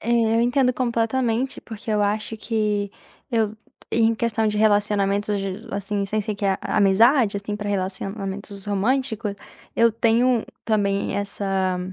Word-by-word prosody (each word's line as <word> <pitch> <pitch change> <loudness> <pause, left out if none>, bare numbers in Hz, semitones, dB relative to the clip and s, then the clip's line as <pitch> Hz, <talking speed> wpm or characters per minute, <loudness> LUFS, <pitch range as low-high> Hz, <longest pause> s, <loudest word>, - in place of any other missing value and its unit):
É, 230 - -7 0.3
eu - - +3
entendo 250 +1 +3
completamente, 240 +1 0
porque 220 -1 -8
eu 210 -1 +2
acho 215 +2 -1
que 210 -3 -1 0.4
eu 220 -2 0 0.4
em 230 0 +3
questão 225 -1 0
de 210 - -2
relacionamentos, 205 -1 +2 0.4
assim, 200 0 -2
sem 215 +2 -1
ser 210 +1 -3
que 200 0 -2
a 190 -1 +1
amizade, 215 +3 +4
assim, 205 +1 -4
pra 205 0 -4
relacionamentos 195 +1 -4
românticos, 220 +1 0 0.4
eu 230 -1 +5
tenho 235 +1 +2 0.2
também 200 -2 0
essa 195 -2 -1
210 Hz, 135 wpm, -23 LUFS, 200-230 Hz, 0.4 s, eu